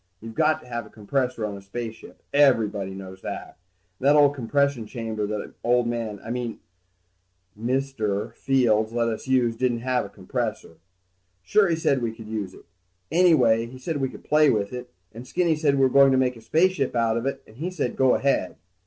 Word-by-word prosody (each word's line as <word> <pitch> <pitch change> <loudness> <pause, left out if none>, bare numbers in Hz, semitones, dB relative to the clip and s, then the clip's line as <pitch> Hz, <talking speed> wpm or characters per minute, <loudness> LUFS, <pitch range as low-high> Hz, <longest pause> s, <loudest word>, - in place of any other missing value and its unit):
You've 115 +2 -9
got 155 +7 +2
to - - -16
have 120 -2 -5
a - - -17
compressor 125 +2 -2
on 105 -1 -4
a 100 - -9
spaceship, 110 +3 -8
everybody 110 -9 +3
knows 95 -1 -9
that. - - -7 0.4
And 135 - 0
that 145 - +6
old 145 -1 +6
compression 140 -2 0
chamber 110 -3 -4
that 105 0 -5
old 120 0 +3
man... 115 -3 -3
I 115 - -5
mean 120 -2 -4 1.0
Mr. 115 -3 -2
Fields 115 -5 +2
let 120 -1 +1
us 110 +3 -5
use 125 -3 +2
didn't 120 -1 0
have 125 0 0
a 100 - -8
compressor. 110 -3 -4 0.7
Sure 205 - +3
he 170 - +1
said 140 -5 +1
we 115 -1 -2
could 110 -1 -11
use 105 -4 -4
it. - - -16 0.5
Anyway 125 -11 +4
he 130 +2 -11
said 155 +4 -3
we 135 -2 -1
could - - -12
play 150 0 +4
with 100 0 0
it, 125 0 -7 0.2
and 120 +3 -10
Skinny 170 +1 +1
said 150 -2 +2
we 135 - +1
were 135 - +6
going 140 +1 +6
to 130 - +3
make 130 -1 +1
a 115 - -13
spaceship 160 0 +1
out 115 -1 +2
of 115 +3 -1
it, 135 - -4
and 110 - -18
he 165 +6 -3
said 155 -9 -3
go 130 -1 +4
ahead. 135 -9 0
120 Hz, 205 wpm, -25 LUFS, 110-135 Hz, 1.0 s, that